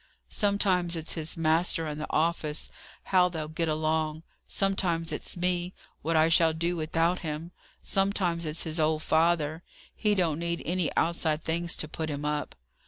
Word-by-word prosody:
Sometimes 190 -4 +1
it's 160 -1 -3
his 160 -1 -2
master 165 +1 +2
and 150 0 -4
the - - -5
office, 155 -1 0 0.3
how 180 -1 +4
they'll 160 -3 -4
get 160 +1 -1
along; 155 0 0 0.2
sometimes 175 -4 0
it's 150 - -4
me, 180 0 0 0.3
what 165 +2 0
I 160 0 +5
shall 165 -1 +4
do 170 +2 -1
without 165 +2 +1
him; 160 +1 -5 0.3
sometimes 190 -4 +1
it's 155 +1 -2
his 160 0 -2
old 155 0 +1
father. 160 -1 +2 0.3
He 210 -2 +2
don't 165 -5 +1
need 170 0 -2
any 175 -2 0
outside 160 -2 +1
things 170 +1 -1
to 155 - -2
put 160 +1 -4
him 145 0 -4
up." 150 0 -2
165 Hz, 165 wpm, -28 LUFS, 155-175 Hz, 0.3 s, I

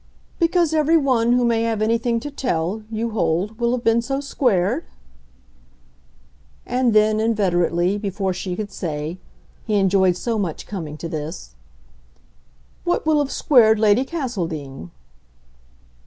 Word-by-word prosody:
"Because 335 -1 +2
every 315 +1 +3
one 245 -5 +2
who 245 0 +3
may 230 -1 +2
have 230 -2 -1
anything 230 +2 +1
to 290 - -6
tell, 210 -7 -2
you 225 +1 -3
hold, 200 +2 -1
will 235 0 +1
have 250 -1 -2
been 230 +1 +3
so 270 +3 -2
squared?" 245 - 0 1.8
And 250 -2 +1
then 215 0 +4
inveterately, 185 -4 +1
before 195 -2 -2
she 180 0 -4
could 205 +1 -5
say 155 0 -4 0.5
he 215 - +1
enjoyed 190 -2 +3
so 230 +2 -2
much 175 -6 -3
coming 160 -7 -6
to 165 - -6
this: 155 - -6 1.3
"What 350 -2 0
will 310 -1 +3
have 290 -2 0
squared 225 -7 +4
Lady 215 +3 +3
Castledean?" 170 - -5
220 Hz, 135 wpm, -21 LUFS, 180-245 Hz, 1.8 s, then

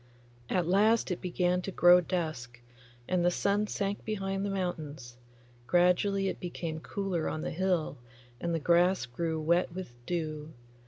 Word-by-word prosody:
At 180 -2 +1
last 210 +4 +3
it 180 - -3
began 180 0 0
to 195 - -5
grow 175 0 +6
dusk, 155 -9 -4 0.5
and 180 -1 +1
the 175 - +4
sun 200 +3 +1
sank 200 0 -2
behind 195 -2 -2
the 200 - -1
mountains; 155 -10 -4 0.5
gradually 180 +3 +3
it - - -3
became 170 -2 -5
cooler 185 -1 -2
on 155 - -4
the - - -3
hill, 175 -5 -1 0.4
and 170 - -2
the 165 - +1
grass 175 +1 +3
grew 160 +6 -3
wet 170 +3 +2
with 185 -10 -6
dew. 155 -3 -3
175 Hz, 155 wpm, -30 LUFS, 160-195 Hz, 0.5 s, grow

